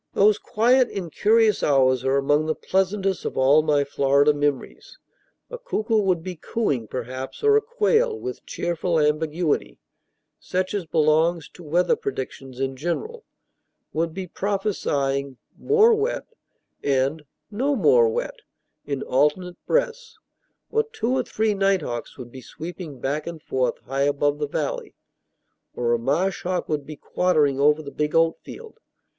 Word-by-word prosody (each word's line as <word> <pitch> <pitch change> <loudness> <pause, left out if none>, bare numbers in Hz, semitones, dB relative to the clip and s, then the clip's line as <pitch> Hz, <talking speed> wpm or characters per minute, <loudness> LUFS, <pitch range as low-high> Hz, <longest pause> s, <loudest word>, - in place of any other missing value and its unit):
Those 210 +1 +4
quiet, 245 +4 +3
incurious 210 +4 +2
hours 130 -3 +3
are 135 +1 +2
among 145 +3 +2
the 155 - 0
pleasantest 190 0 -1
of - - -4
all 140 +4 +5
my 150 -2 +2
Florida 140 +1 +3
memories. 145 -2 -3 0.5
A - - -6
cuckoo 225 - 0
would 185 -5 +1
be 185 0 -5
cooing, 150 - -2
perhaps; 130 - -6
or 430 0 +5
a 435 - +4
quail, 450 0 +1
with 390 +1 -6
cheerful 170 -1 -1
ambiguity, 150 - 0 0.6
such 185 +1 -2
as 195 -5 -3
belongs 160 +1 +2
to - - -15
weather 170 +3 +2
predictions 130 -1 -6
in 135 0 -2
general, 305 - -4 0.7
would 165 +1 -1
be 190 +3 -5
prophesying 145 - -2 0.2
"more 445 +2 +4
wet" 435 +2 -1 0.6
and 140 +3 0 0.3
"no 270 +7 0
more 460 - +4
wet" - - -3 0.5
in 140 -2 -3
alternate 150 +7 0
breaths; 485 -1 -1 0.5
or 450 - +3
two 445 - -3
or 260 - +2
three 220 -3 0
night 195 -3 +1
hawks 120 -3 -6
would 120 -2 -9
be 130 - -10
sweeping 160 -2 -8
back 145 +6 -2
and 170 -2 -7
forth 130 -1 -1
high 135 +1 -3
above 145 0 +1
the 150 - -1
valley; - - -4 0.8
or 120 -1 0
a 120 - +1
marsh 160 +10 0
hawk 180 0 -2
would 150 -2 -3
be 155 - -7
quartering 150 -4 +1
over 150 +2 +3
the 140 - -8
big 150 0 -2
oatfield. 395 - -1
165 Hz, 150 wpm, -23 LUFS, 140-215 Hz, 0.8 s, all